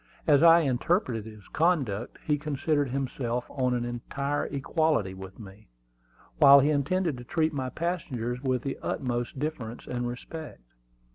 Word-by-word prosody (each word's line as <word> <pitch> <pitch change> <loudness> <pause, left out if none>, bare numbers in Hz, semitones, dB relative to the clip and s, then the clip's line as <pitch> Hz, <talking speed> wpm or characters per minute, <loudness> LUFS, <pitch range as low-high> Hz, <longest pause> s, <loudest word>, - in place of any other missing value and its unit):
As 145 -3 +5
I 170 0 +8
interpreted 130 - 0
his 105 -2 -15
conduct, 135 - 0
he 150 -2 +1
considered 145 -1 0
himself 125 -2 -2
on 125 -2 0
an 120 -1 -1
entire 140 +4 -3
equality 145 - 0
with 95 0 -10
me, 100 0 -12 0.7
while 140 0 +9
he 145 +3 +3
intended 155 0 0
to - - -8
treat 155 +4 0
my 130 -2 -2
passengers 130 -7 -3
with 130 -3 0
the 135 - -4
utmost 120 -1 -2
deference 130 -6 -4
and 120 -1 -3
respect. 145 - -8
135 Hz, 145 wpm, -28 LUFS, 120-155 Hz, 0.7 s, while